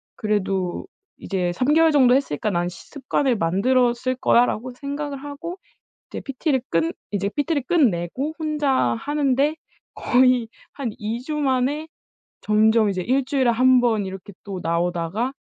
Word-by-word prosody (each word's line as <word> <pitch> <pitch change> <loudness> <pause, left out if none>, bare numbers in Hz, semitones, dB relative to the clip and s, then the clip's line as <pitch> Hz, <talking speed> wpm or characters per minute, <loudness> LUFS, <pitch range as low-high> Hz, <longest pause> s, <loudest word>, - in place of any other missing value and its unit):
그래도 195 - -2 0.3
이제 180 -3 -2
3 255 +11 +1
개월 325 0 +5
정도 260 -4 +5
했으니까 215 - -1
나는 175 -2 -1
시 180 - -13
습관을 265 -2 0
만들었을 245 +8 +1
거야.'라고 245 +1 +2
생각을 285 +1 -5
하고 310 +5 -7 0.5
이제 - - -6
PT를 275 -1 -1
끝 165 0 0 0.2
이제 200 -1 -1
PT를 290 -1 0
끝내고 260 - 0
혼자 305 -2 -1 0.3
하는데 290 0 +1 0.4
거의 250 -2 +3 0.2
한 265 -5 -4
2 220 +3 -3
주 305 - -3
만에 280 +2 0 0.6
점점 215 0 +3
이제 185 -2 -2
1 265 +7 +1
주일에 265 -2 +1
1 255 +2 +4
번 220 -5 +1
이렇게 190 +1 -9
또 195 -2 -6
나오다가 175 +7 -1
250 Hz, 285 characters per minute, -22 LUFS, 200-280 Hz, 0.6 s, 개월